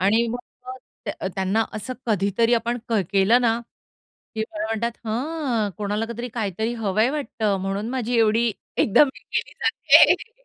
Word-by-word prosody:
आणि 220 +5 +3
मग 240 - -3 0.8
अ, 190 - -2
त्यांना 195 +3 +1
असं 215 +4 -5
कधीतरी 215 +2 +2
आपण 235 +1 -1
केलं 200 +2 +3
ना, 230 -1 +2 0.7
की 220 - -1
मला 210 0 -3
म्हणतात, 225 +1 -1
"हं, 245 -3 -1
कोणाला 210 +1 -2
काहीतरी 235 +1 -5
काहीतरी 220 +1 -2
हवंय 220 +1 +1
वाटतं 225 -8 -1
म्हणून 195 +3 -3
माझी 245 -2 -1
एवढी 225 +1 +3 0.2
एकदम 275 +7 +5
हे - - -14
केली - - -4
जातीये." 485 +2 +4
225 Hz, 145 wpm, -23 LUFS, 205-240 Hz, 0.8 s, एकदम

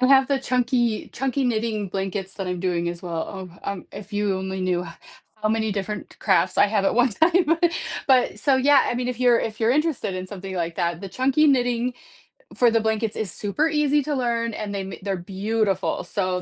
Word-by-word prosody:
I 255 - +4
have 270 -1 +6
the 275 -1 +1
chunky 245 -3 0
chunky 270 +1 -1
knitting 220 -4 -1
blankets 195 0 -4
that 195 -2 -5
I'm 180 -1 -3
doing, 175 -2 0
as 170 0 -5
well. 180 +2 -5
Oh, - - -18
um, 200 -2 -5
if 205 +1 -10
you 205 -2 0
only 190 0 -4
knew 180 -1 0 0.5
how 215 0 -1
many 220 -1 0
different 205 +1 -5
crafts 185 -2 +2
I - - +7
have 205 -1 0
at - - +2
one 245 0 +4
time, 330 - +3 0.5
but 250 -6 +3
so, 270 +3 +3
yeah, 275 +1 +5
I - - -1
mean 250 0 -2
if 250 0 -4
you're 245 -2 +5
if 220 0 -4
you're 225 +1 +3
interested 300 - 0
in 185 0 -4
something 190 -1 -7
like 170 -1 -2
that, 170 -2 -1
the 195 - -6
chunky 270 +7 +2
knitting 245 -2 +2 0.6
for 240 -2 +5
the 225 -1 +2
blankets 220 0 -1
is 210 -6 -1
super 255 +11 0
easy 295 -1 +2
to 295 +2 -2
learn 235 -2 -1
and 210 -1 -4
they 195 - -2
ma 190 - -6
they're 195 -1 -1
beautiful, 195 +1 -1
so 185 -2 -2
215 Hz, 210 wpm, -23 LUFS, 190-250 Hz, 0.6 s, I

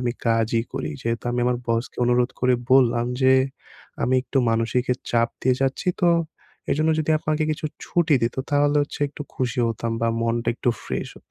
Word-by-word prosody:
আমি 120 -1 -1
কাজই 115 0 +2
করি। 75 - -3
যেহেতু 115 0 -2
আমি 120 - 0
আমার 125 -1 +1
বসকে 115 +1 -1
অনুরোধ 120 0 +2
করে 125 0 +3 0.2
বললাম 120 -2 +4 0.2
যে, 130 - +6 0.7
আমি 130 - +2
একটু 135 - -1
মানসিক 115 +2 +1 0.3
চাপ 115 -1 +2
দিয়ে 130 0 +3
যাচ্ছি 135 +7 -1
তো! 175 - +5 0.6
এজন্য 155 +2 +2
যদি 155 +1 -1
আপনাকে 155 0 -1
কিছু 155 - -7 0.2
ছুটি 170 -3 +2
দিত 115 +3 0
তাহলে 145 0 +3
হচ্ছে 145 - -7
একটু 145 +1 -8
খুশি 125 -1 -2
হতাম 115 0 -2
বা 115 - +2
মনটা 115 0 0
একটু 120 - 0
ফ্রেশ - - -3
হত। - - -31
125 Hz, 180 wpm, -23 LUFS, 115-145 Hz, 0.7 s, যে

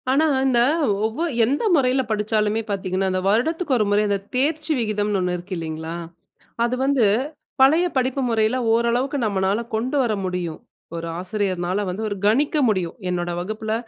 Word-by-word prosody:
ஆனா 280 +5 +3 0.2
இந்த 255 -3 +3 0.5
ஒவ்வொ 225 +9 -2 0.2
எந்த 275 - 0
முறையில 260 -2 +3
படிச்சாலுமே 215 0 0
பார்த்தீங்கன்னா, 190 -1 -1
அந்த 185 - 0
வருடத்துக்கு 295 - +1
ஒரு 215 - +2
முறை, 205 +1 +3
அந்த 200 - +2 0.2
தேர்ச்சி 305 +4 0
விகிதம்ன்னு 210 -2 0
ஒன்னு 180 -1 0
இருக்கு 180 +2 -8
இல்லீங்களா? 160 0 -5 0.7
அது 240 +1 +1
வந்து, 270 -4 +3 0.6
பழைய 310 +7 +5
படிப்பு 260 +1 0
முறையில 225 +2 +2 0.2
ஓரளவுக்கு 240 +5 +1
நம்மனால 200 +1 0
கொண்டு 245 +6 -1
வர 230 -3 0
முடியும். 180 -3 -3 0.4
ஒரு 165 0 -4
ஆசிரியருனால 185 -1 -1
வந்து, 190 +5 -4
ஒரு 205 - -3
கணிக்க 280 +9 +2
முடியும். 185 -6 0 0.2
என்னோட 175 -1 -2
வகுப்புல, 215 +4 -3
215 Hz, 150 wpm, -22 LUFS, 190-255 Hz, 0.7 s, பழைய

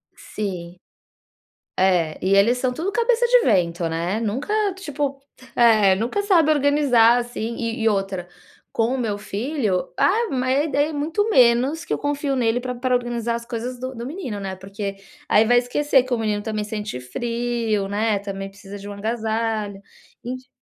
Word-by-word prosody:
Sim. 180 -4 -6 1.0
É, 180 -4 +2
e 195 +1 +4
eles 230 +5 +4
são 250 0 0
tudo 355 +9 -2
cabeça 470 +2 +2
de - - +5
vento, 170 -5 +2
né, 170 +6 -1
nunca, 240 - -2 0.2
tipo, 290 -6 -3 0.4
é 215 -5 +5
nunca 235 - -1
sabe 335 -6 +4
organizar, 275 -5 +4
assim. 235 -1 -4
E 230 0 -3
e 225 - +3
outra, 195 -3 -2 0.4
com 230 +3 +1
o - - -2
meu 220 -5 -1
filho, 210 - -2
ah, 455 +4 +3
mas 260 +3 +1
é - - -2
daí 290 0 +2
é 315 - -6
muito 325 +9 0
menos 255 - +4
que - - -2
eu - - 0
confio 285 -1 -1
nele 240 -1 +1
pra 250 0 -4
pra 250 +1 -1
organizar 240 -1 -1
as 235 0 -6
coisas 240 +1 -5
do 255 0 -5
do 235 - -6
menino, 265 - -5
né. 195 -1 -4
Porque 195 +1 -6 0.3
aí 215 +2 +5
vai 245 +2 +4
esquecer 265 +2 +2
que 255 -1 -3
o - - +2
menino 210 -2 -1
também 215 -2 -3
sente 210 - -5
frio, 230 - -2
né, 210 +1 0
também 195 -1 -6
precisa 200 0 -11
de 200 +1 -9
um 205 - -6
agasalho, 220 -1 -2 0.4
enf 255 +1 -6
235 Hz, 175 wpm, -22 LUFS, 205-265 Hz, 1.0 s, de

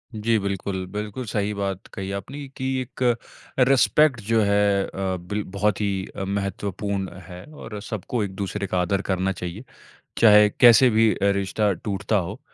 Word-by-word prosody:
जी, 110 +1 +1
बिल्कुल। 95 -1 -3
बिल्कुल 105 +4 -5
सही 105 0 -1
बात 100 0 -4
कही 95 -1 -5
आपने 140 +5 -9
की 130 - -3
एक 130 +1 -10 0.7
रिस्पेक्ट 135 0 +4
जो 115 -1 +4
है 100 -1 +3
अ, - - -9 0.3
बिल 100 +4 -4
बहुत 105 0 +1
ही 95 -2 -1
अ, 95 - -4
महत्वपूर्ण 100 0 -3 0.2
है 90 0 -10
और 110 -7 -8
सबको 110 +2 -3
एक 95 -1 -5
दूसरे 100 0 -3
का 90 - -1
आदर 95 +2 0
करना 95 +1 +1
चाहिए, 90 +5 -6 0.5
चाहे 105 -2 +7
कैसे 120 +1 +8
भी 110 0 +4
अ, - - -7 0.2
रिश्ता 100 +1 0
टूटता 105 +2 -2
हो। 100 +7 -3
100 Hz, 165 wpm, -24 LUFS, 95-110 Hz, 0.7 s, कैसे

